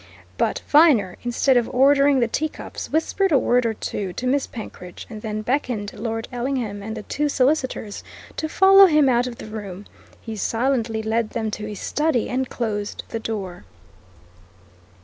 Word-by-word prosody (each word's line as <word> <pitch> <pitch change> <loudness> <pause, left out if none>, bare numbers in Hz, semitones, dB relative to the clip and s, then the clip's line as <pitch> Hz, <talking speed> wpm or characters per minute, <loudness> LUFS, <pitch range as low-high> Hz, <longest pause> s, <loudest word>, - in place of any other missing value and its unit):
But - - -1
Viner, 280 - +5
instead 245 +2 +2
of 235 - +1
ordering 275 +1 +4
the 235 - +3
teacups, 310 +7 -4
whispered 365 +4 +1
a 285 - +6
word 245 -1 +2
or 220 - -2
two 195 -3 -4
to 255 - -5
Miss 270 +2 +1
Penkridge, 180 -6 -9
and 215 -1 -7
then 215 -1 -4
beckoned 240 -5 -2
Lord 225 +1 -4
Ellingham 245 -5 -3
and 220 +2 -6
the 215 - -6
two 295 +6 -1
solicitors 260 -6 0 0.3
to 315 - -2
follow 390 +3 +7
him 305 -4 +4
out 245 -1 +2
of 245 - -6
the - - -10
room. 205 -3 -7 0.3
He 225 -1 -7
silently 225 0 -1
led 220 0 0
them 220 -2 -3
to 210 0 -5
his 210 -2 -7
study 295 -6 0
and 260 0 -1
closed 210 -3 -3
the 225 - -3
door. 195 - -5
235 Hz, 170 wpm, -22 LUFS, 215-275 Hz, 0.3 s, follow